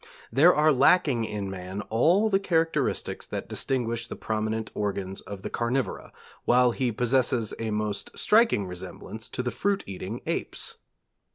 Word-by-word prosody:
There 150 Hz, +9 st, +6 dB
are 155 Hz, +1 st, +5 dB
lacking 135 Hz, -3 st, +4 dB
in 105 Hz, -2 st, -4 dB
man 95 Hz, +1 st, -5 dB
all 175 Hz, -, +4 dB
the 195 Hz, -2 st, +3 dB
characteristics 165 Hz, -6 st, 0 dB
that -, -, -5 dB
distinguish 120 Hz, -3 st, -1 dB
the -, -, -6 dB
prominent 110 Hz, 0 st, -2 dB
organs 95 Hz, -2 st, -3 dB
of 100 Hz, 0 st, -9 dB
the -, -, -3 dB
carnivora, 120 Hz, +3 st, -2 dB, 0.3 s
while 125 Hz, 0 st, +4 dB
he 125 Hz, 0 st, 0 dB
possesses 125 Hz, -1 st, +1 dB
a 115 Hz, -1 st, -2 dB
most 105 Hz, -1 st, -3 dB
striking 215 Hz, -, +4 dB
resemblance 95 Hz, +5 st, -6 dB
to 125 Hz, -, -3 dB
the 125 Hz, -, -1 dB
fruit 200 Hz, +6 st, 0 dB
eating 100 Hz, +4 st, -6 dB
apes. -, -, -2 dB
115 Hz, 150 wpm, -27 LUFS, 105-140 Hz, 0.3 s, There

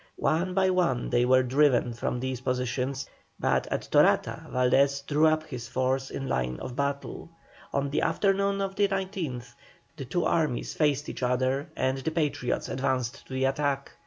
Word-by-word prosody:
One 180 Hz, +4 st, 0 dB
by 190 Hz, -1 st, +3 dB
one 170 Hz, -10 st, +1 dB
they 120 Hz, 0 st, +3 dB
were 130 Hz, +1 st, +5 dB
driven 125 Hz, -2 st, +3 dB
from 120 Hz, +1 st, -2 dB
these 130 Hz, -1 st, -3 dB
positions, 125 Hz, +1 st, -2 dB, 0.3 s
but -, -, +1 dB
at -, -, -3 dB
Torata -, -, +3 dB
Valdés 140 Hz, +2 st, +2 dB
drew 150 Hz, +2 st, +3 dB
up 155 Hz, 0 st, +2 dB
his 125 Hz, -7 st, -7 dB
force 130 Hz, +2 st, -1 dB
in 135 Hz, -, -5 dB
line 65 Hz, -, -1 dB
of 125 Hz, -, -6 dB
battle. 140 Hz, +3 st, -3 dB, 0.4 s
On 140 Hz, 0 st, -1 dB
the -, -, +1 dB
afternoon 200 Hz, 0 st, +1 dB
of 195 Hz, 0 st, -2 dB
the 205 Hz, 0 st, +3 dB
19th 185 Hz, -, -4 dB, 0.4 s
the 135 Hz, -, -5 dB
two 175 Hz, +7 st, -1 dB
armies 155 Hz, -7 st, 0 dB
faced 145 Hz, -2 st, +1 dB
each -, -, -6 dB
other, 130 Hz, +4 st, 0 dB
and 130 Hz, +1 st, 0 dB
the 135 Hz, -, -2 dB
Patriots 150 Hz, -6 st, -1 dB
advanced 130 Hz, -2 st, -2 dB
to -, -, -9 dB
the 130 Hz, 0 st, +1 dB
attack. 140 Hz, 0 st, -1 dB
135 Hz, 170 wpm, -27 LUFS, 125-155 Hz, 0.4 s, were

